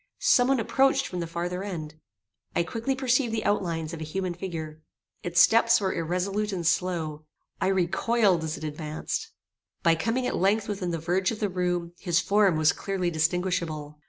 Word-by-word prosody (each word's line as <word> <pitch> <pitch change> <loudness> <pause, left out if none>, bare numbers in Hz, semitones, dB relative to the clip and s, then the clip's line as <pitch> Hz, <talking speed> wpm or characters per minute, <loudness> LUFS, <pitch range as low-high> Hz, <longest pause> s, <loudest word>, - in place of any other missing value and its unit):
Some 245 0 +4
one 270 -1 +3
approached 270 +4 +2
from 180 - -5
the 170 - -3
farther 175 +2 -3
end. 160 -6 -5 0.6
I 170 - +3
quickly 230 +9 -2
perceived 255 -2 +1
the 220 -1 -2
outlines 170 -5 -1
of 165 - -6
a - - -2
human 180 +3 -3
figure. 160 -4 -6 0.4
Its 175 -1 0
steps 230 +5 +6
were 190 -2 -1
irresolute 190 +5 -1
and 175 -3 -3
slow. 160 -3 -1 0.4
I - - +2
recoiled 190 0 +2
as 155 -1 -3
it - - -10
advanced. 155 0 -4 0.5
By 165 - +5
coming 225 +10 -1
at - - -1
length 200 +3 +2
within 195 -4 -3
the 170 - -1
verge 180 +4 0
of 225 - -4
the 210 - 0
room, 175 -2 -1
his 170 -2 +1
form 200 +1 +3
was 155 0 +4
clearly 185 -3 -2
distinguishable. 160 -2 -1
180 Hz, 180 wpm, -27 LUFS, 165-205 Hz, 0.6 s, steps